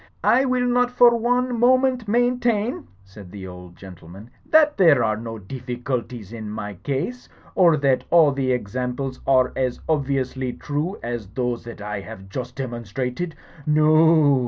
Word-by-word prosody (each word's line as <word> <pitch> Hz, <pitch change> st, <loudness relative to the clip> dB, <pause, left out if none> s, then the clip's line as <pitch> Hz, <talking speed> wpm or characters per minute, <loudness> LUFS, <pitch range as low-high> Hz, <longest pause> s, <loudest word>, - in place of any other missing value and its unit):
*1 260 Hz, +2 st, +3 dB
will 250 Hz, -1 st, +1 dB
not 245 Hz, 0 st, +2 dB
for 245 Hz, -1 st, +5 dB
one 245 Hz, +1 st, 0 dB
moment 255 Hz, -1 st, +3 dB
maintain," 240 Hz, -, 0 dB, 0.2 s
said 95 Hz, -1 st, -13 dB
the 100 Hz, -2 st, -8 dB
old 90 Hz, -1 st, -11 dB
gentleman, 95 Hz, +4 st, -13 dB, 0.2 s
that 305 Hz, -1 st, +5 dB
there 160 Hz, -, +5 dB
are 110 Hz, -1 st, +1 dB
no 115 Hz, +1 st, -7 dB
difficulties 120 Hz, 0 st, -5 dB
in 110 Hz, -2 st, -7 dB
my 105 Hz, -1 st, -5 dB
case; 140 Hz, -, -4 dB, 0.2 s
or 170 Hz, -4 st, +4 dB
that 135 Hz, -2 st, +1 dB
all 165 Hz, -4 st, +5 dB
the 135 Hz, -2 st, -1 dB
examples 125 Hz, +3 st, -3 dB
are 130 Hz, -1 st, +3 dB
as 130 Hz, -2 st, -1 dB
obviously 135 Hz, -4 st, -1 dB
true 150 Hz, +7 st, -3 dB
as 120 Hz, -3 st, -4 dB
those 120 Hz, +3 st, -3 dB
that 115 Hz, -2 st, -9 dB
I 105 Hz, 0 st, -4 dB
have 95 Hz, +1 st, -10 dB
just 125 Hz, +4 st, -6 dB
demonstrated. 125 Hz, -, -4 dB, 0.3 s
No 150 Hz, 0 st, +4 dB
o. 155 Hz, -4 st, +5 dB
130 Hz, 155 wpm, -22 LUFS, 115-190 Hz, 0.3 s, for